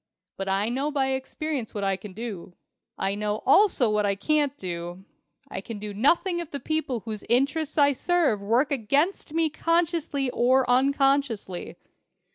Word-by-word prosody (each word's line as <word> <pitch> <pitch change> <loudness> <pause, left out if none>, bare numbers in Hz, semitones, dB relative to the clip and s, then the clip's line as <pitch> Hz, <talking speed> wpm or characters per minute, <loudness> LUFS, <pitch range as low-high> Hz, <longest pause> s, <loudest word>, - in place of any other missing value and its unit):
But 195 0 -4
I 195 +2 +1
know 270 +5 -1
by 275 -3 0
experience 265 -1 -4
what 205 - -2
I 195 -1 +1
can 190 +1 -10
do. 195 -5 -7 0.4
I 195 +1 -1
know 210 +1 -2
also 310 - +5
what 210 0 +1
I 200 -1 +1
can't 290 +5 +1
do. 175 +1 -6 0.4
I 190 - -6
can 225 +1 -7
do 205 0 -6
nothing 345 - +2
if 340 -3 -5
the 285 - -5
people 310 -7 -2
whose 215 -2 -6
interests 285 +6 +1
I 285 -1 +5
serve 315 - +1
work 235 +9 +1
against 280 - 0
me 325 -2 +2
consciously 330 -5 0
or 255 +2 +3
unconsciously. 270 -6 +1
260 Hz, 160 wpm, -26 LUFS, 210-295 Hz, 0.4 s, also